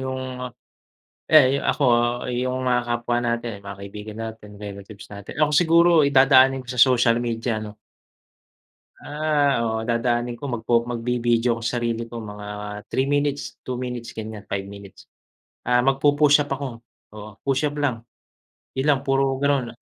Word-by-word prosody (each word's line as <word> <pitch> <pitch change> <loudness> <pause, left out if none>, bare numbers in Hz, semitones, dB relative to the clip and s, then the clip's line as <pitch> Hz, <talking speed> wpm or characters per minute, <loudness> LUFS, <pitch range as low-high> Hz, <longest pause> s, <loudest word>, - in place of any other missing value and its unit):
yung, 130 -1 -5 0.8
eh, 140 -3 +6
yu - - -4
ako 145 - 0 0.5
ayung 130 +1 -2
mga 125 -1 +1
kapwa 120 0 -1
natin, 120 -2 -2
yung 100 - -17
mga 100 0 -7
kaibigan 105 +2 -8
natin, 110 -2 -8
relatives 100 0 -9
natin. 100 -1 -9
Ako 150 - +3
siguro 170 +2 +5 0.2
dadaanin 135 -1 +5
ko 125 - -22
sa 125 - -6
social 120 -2 +5
media 115 -1 -2
'no. 105 0 -8 1.3
Ah, 145 -2 +1
oo. 110 0 -1
Dadaanin 120 0 0
ko 145 - -8
magpo 120 -2 0
magbi-video 120 0 0
ako - - -9
sa 120 0 -1
sarili 115 0 -2
ko 115 0 -8
mga 105 -1 -8 0.4
3 135 +2 0
minutes, 145 -4 -1
2 130 - -3
minutes, 125 -2 -5
ganyan, 110 -2 -7
5 100 0 -4
minutes. 100 -1 -13 0.6
Ah, 125 0 +3
magpu-push-up 145 +2 +3
ako 135 -4 -5 0.3
oo, 105 -1 -10
push-up 140 +2 0
lang, 135 -6 -1 0.7
'yon 135 +3 0
lang 140 -2 +4
puro 135 -1 +1
gano'n. 140 -3 +1
125 Hz, 150 wpm, -23 LUFS, 115-135 Hz, 1.3 s, eh